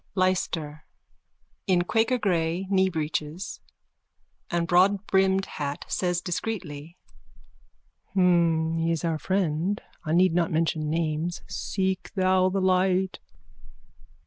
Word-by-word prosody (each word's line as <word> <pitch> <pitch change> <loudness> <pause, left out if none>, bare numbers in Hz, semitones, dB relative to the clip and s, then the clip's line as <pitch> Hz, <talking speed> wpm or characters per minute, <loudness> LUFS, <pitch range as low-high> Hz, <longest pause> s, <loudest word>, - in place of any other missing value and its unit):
LYSTER: 165 -5 -1 0.8
(In 180 -2 +3
quakergrey 190 -6 0
kneebreeches 170 -1 -1 0.9
and 170 -1 0
broadbrimmed 190 +1 +3
hat, 145 -1 -5
says 175 -1 -1
discreetly.) 175 -4 -5 1.2
He 165 -3 +2
is 165 0 -1
our 160 -2 -1
friend. 185 +1 0 0.2
I 155 -1 -2
need 180 0 +4
not 170 -1 +1
mention 160 -1 0
names. 160 +1 -2
Seek 190 -1 -2
thou 185 -1 +3
the 195 +1 -1
light. 185 0 +2
180 Hz, 95 wpm, -26 LUFS, 160-190 Hz, 1.2 s, need